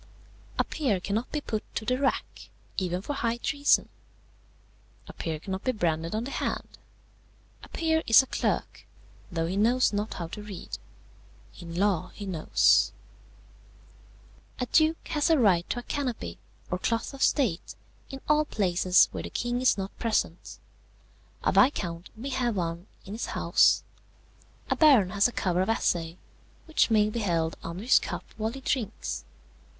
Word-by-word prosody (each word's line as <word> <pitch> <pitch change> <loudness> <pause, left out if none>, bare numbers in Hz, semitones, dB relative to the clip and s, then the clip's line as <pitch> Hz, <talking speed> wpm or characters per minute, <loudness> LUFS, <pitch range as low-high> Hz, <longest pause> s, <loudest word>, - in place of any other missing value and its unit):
"A - - +3
peer 255 - -1
cannot 210 +6 -2
be 300 - -2
put 215 -6 -3
to 220 - -3
the 255 +3 0
rack, 275 - -2 0.3
even 180 -1 -2
for 290 - -3
high 235 -4 -1
treason. 285 +3 +2 1.2
A - - -9
peer 160 -2 -4
cannot 190 +4 -5
be 255 - +1
branded 165 -4 -1
on 220 - -1
the 270 - -6
hand. - - -4 0.8
A - - -13
peer 320 -1 +1
is 225 +3 +8
a - - -8
clerk, - - -2 0.4
though 165 -1 -1
he 175 +3 -2
knows 235 +4 +3
not 205 +2 -2
how 170 - -4
to 210 - -7
read. 205 -3 -7 0.8
In 170 -2 -8
law 195 -2 +1
he 205 - -7
knows. 175 -5 +3 1.7
"A 250 - 0
duke 315 +5 +2
has 305 -1 +1
a 325 - +5
right 190 -9 +3
to - - -1
a 245 - -4
canopy, 245 - -4 0.3
or 180 - -1
cloth 230 +6 -1
of 275 - -9
state, 225 - +1 0.3
in 270 -1 -8
all 300 0 +3
places 185 -5 +3
where - - -5
the - - -6
king 245 0 -2
is 255 - +4
not 195 0 -5
present; 215 -7 -1 0.9
a - - +3
viscount 175 - +2
may 260 +5 -5
have 245 -4 0
one 170 0 -3 0.2
in 200 - -7
his 225 - -4
house; - - +4 0.8
a - - +1
baron 260 - +5
has 200 +2 +4
a - - -6
cover 180 -5 0
of 190 - -1
assay, 170 -6 0 0.5
which 320 -6 +2
may 215 -2 +4
be 215 +2 -3
held 165 -6 0
under 170 +4 -6
his 250 - +5
cup - - -5
while 220 0 -1
he 270 +2 -9
drinks. 235 -5 -3
215 Hz, 165 wpm, -28 LUFS, 180-255 Hz, 1.7 s, is